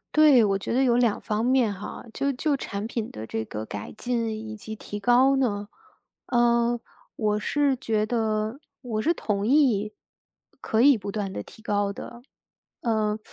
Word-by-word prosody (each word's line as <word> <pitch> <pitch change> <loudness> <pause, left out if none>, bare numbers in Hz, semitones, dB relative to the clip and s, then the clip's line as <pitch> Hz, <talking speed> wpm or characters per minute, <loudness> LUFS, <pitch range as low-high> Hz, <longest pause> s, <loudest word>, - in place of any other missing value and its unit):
对， 295 -6 +7
我 195 -1 +2
觉 195 - -4
得 260 - +3
有 240 -2 +3
两 235 -4 +2
方 215 +2 -1
面 250 -4 +3
哈， 200 +1 -7
就 280 0 0
就 280 +2 0
产 200 -3 -4
品 230 -2 -4
的 110 +1 -7
这 110 0 -3
个 105 0 -5
改 105 0 -7
进 235 -1 -1 0.2
以 220 - -6
及 220 +1 -7
提 205 -1 -7
高 250 +5 +4
呢， 205 -6 0 0.6
呃， 240 0 +2 0.4
我 210 -1 0
是 285 +4 +1
觉 215 -4 0
得 220 +1 -1 0.2
我 220 -4 -2
是 335 +7 +2
同 205 -7 -2
意 230 -6 +3 0.7
可 220 +1 +1
以 280 -1 +7
不 200 -1 -6
断 200 -2 -3
地 - - -5
提 220 - -16
高 205 -1 0
的。 240 +4 -9 0.6
呃， 215 -2 0
220 Hz, 185 characters per minute, -26 LUFS, 210-245 Hz, 0.7 s, 对